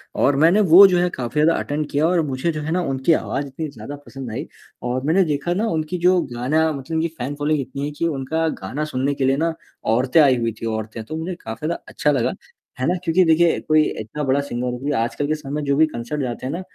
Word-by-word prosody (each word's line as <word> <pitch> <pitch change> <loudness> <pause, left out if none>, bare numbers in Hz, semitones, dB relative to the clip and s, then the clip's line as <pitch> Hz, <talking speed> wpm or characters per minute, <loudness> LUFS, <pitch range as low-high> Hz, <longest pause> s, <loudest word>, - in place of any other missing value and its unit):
और 140 - +3
मैंने 180 +6 +5
वो 195 +4 +11
जो 180 - +2
है 180 0 +2
काफ़ी 130 +1 -2
ज़्यादा 165 +2 +3
अटेंड 150 +1 -3
किया 150 +3 +2
और 175 -1 +2
मुझे 135 +5 -1
जो 155 - -4
है 155 +2 -4
ना 180 +1 +1
उनकी 135 +5 +2
आवाज़ 140 -2 -1
इतनी 150 +4 -5
ज़्यादा 140 +2 -8
पसंद 130 -4 -8
आई। 135 +8 -4 0.5
और 130 +1 -2
मैंने 180 +5 +4
देखा 150 +3 -1
ना 215 +5 0
उनकी 160 0 -2
जो 185 0 +5
गाना 155 +7 +1
मतलब 145 +3 -5
उनकी 160 +1 +1
फैन 135 +4 -4
फॉलोइंग 150 0 0
इतनी 140 +2 -5
है 150 - -4
कि 170 - +2
उनका 160 +2 -1
गाना 130 +11 -3
सुनने 135 +3 0
के 135 - -1
लिए 135 +1 +2
ना, 165 +1 0 0.3
औरतें 125 +7 +2
आई 130 -3 +5
हुई 115 -1 -1
थी - - -3
औरतें 110 0 -4
तो 155 - -7
उन्हें 170 +3 -4
काफ़ी 115 +7 -5
ज़्यादा 170 - -3
अच्छा 150 - 0
लगा। 130 -5 0 0.5
है 130 - 0
ना? 180 - +2
क्योंकि 180 +1 +3
देखिए 165 +1 +4
कोई 155 0 +3 0.2
इतना 145 +8 -5
बड़ा 135 +1 +2
सिंगर 125 -3 -4
वो 125 - -4
भी 145 +2 -2
आजकल 130 +5 -1
के 155 - +1
समय 150 0 -5
जो 140 0 +1
भी 160 - +6
कंसर्ट 130 +2 -4
जाते 125 -1 -4
हैं 135 - -2
ना, 175 - -4
145 Hz, 250 wpm, -21 LUFS, 130-160 Hz, 0.5 s, वो